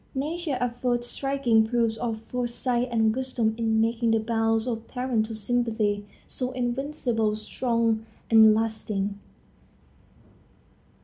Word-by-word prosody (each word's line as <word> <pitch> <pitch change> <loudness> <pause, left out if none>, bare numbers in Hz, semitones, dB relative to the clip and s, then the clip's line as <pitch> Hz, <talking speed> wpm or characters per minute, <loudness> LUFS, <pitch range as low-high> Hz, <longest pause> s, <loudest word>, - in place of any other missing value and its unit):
Nature 300 +1 -2
affords 245 0 -1
striking 265 -4 +1
proofs 230 -1 +1
of 225 -2 -3
foresight 245 0 -1
and 220 -2 +2
wisdom 255 -4 0
in 225 -1 +1
making 230 +1 +1
the 225 0 +3
bonds 225 0 +1
of 230 -2 -4
parental 235 -4 -1
sympathy 215 -2 0 0.2
so 255 -1 -3
invincibly 245 -3 -1
strong 230 0 0 0.3
and 220 -1 +8
lasting. 210 -2 -2
230 Hz, 110 wpm, -26 LUFS, 220-250 Hz, 0.3 s, and